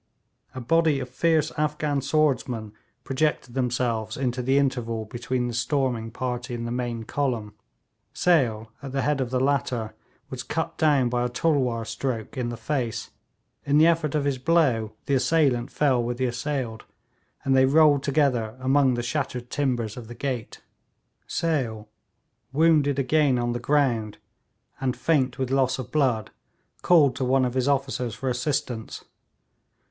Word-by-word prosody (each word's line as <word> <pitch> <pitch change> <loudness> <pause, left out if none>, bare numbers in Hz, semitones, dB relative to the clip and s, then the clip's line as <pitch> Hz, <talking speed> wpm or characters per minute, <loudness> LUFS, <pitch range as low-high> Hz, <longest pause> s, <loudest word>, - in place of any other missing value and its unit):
A - - -4
body 155 +3 +2
of 125 -1 -5
fierce 160 +4 +1
Afghan 150 -1 0
swordsmen 130 -7 0 0.3
projected 135 -1 -1
themselves 120 -3 -1
into 125 -1 -1
the 130 +3 +2
interval 120 -5 0
between 125 +2 -2
the 120 - -4
storming 120 -2 -1
party 125 0 -4
and 115 0 -4
the 120 - -4
main 120 -2 -3
column. 115 -5 -2 0.6
Sale, 115 -10 +1
at 135 -2 -7
the 135 - 0
head 145 -2 +1
of 125 - -2
the 130 0 0
latter, 125 -5 0 0.4
was - - -4
cut - - -3
down 145 -5 +3
by 120 0 0
a 125 - 0
tulwar 125 -4 0
stroke 115 0 -4
in 125 -3 -2
the 120 - -5
face; 120 -2 -3 0.5
in 145 +1 +2
the 155 - +7
effort 165 -3 +2
of 145 -2 0
his 140 -2 0
blow 130 -8 +2
the 140 - -1
assailant 130 -2 +2
fell 135 -5 +2
with 120 +1 -3
the 130 - 0
assailed, 120 -2 -3 0.6
and 135 -1 +2
they 130 0 +6
rolled 150 0 +5
together 135 -6 +1
among 130 0 +3
the 120 - -2
shattered 125 -1 -3
timbers 120 -6 -1
of 120 -3 -8
the 120 - -9
gate. 125 -4 -4 0.6
Sale, 120 -10 -1 0.6
wounded 150 -2 +3
again 140 -1 +2
on 120 0 0
the 120 - -2
ground, 120 -6 +1 0.6
and 130 -2 -1
faint 130 -3 +1
with 130 -1 -2
loss 130 -1 +2
of 125 -2 -7
blood, 130 -8 +1 0.5
called 150 -7 +5
to 130 - -1
one 130 +1 +3
of 125 - -2
his 130 0 0
officers 130 -4 0
for 135 - -3
assistance. 125 -3 -3
130 Hz, 160 wpm, -25 LUFS, 120-140 Hz, 0.6 s, the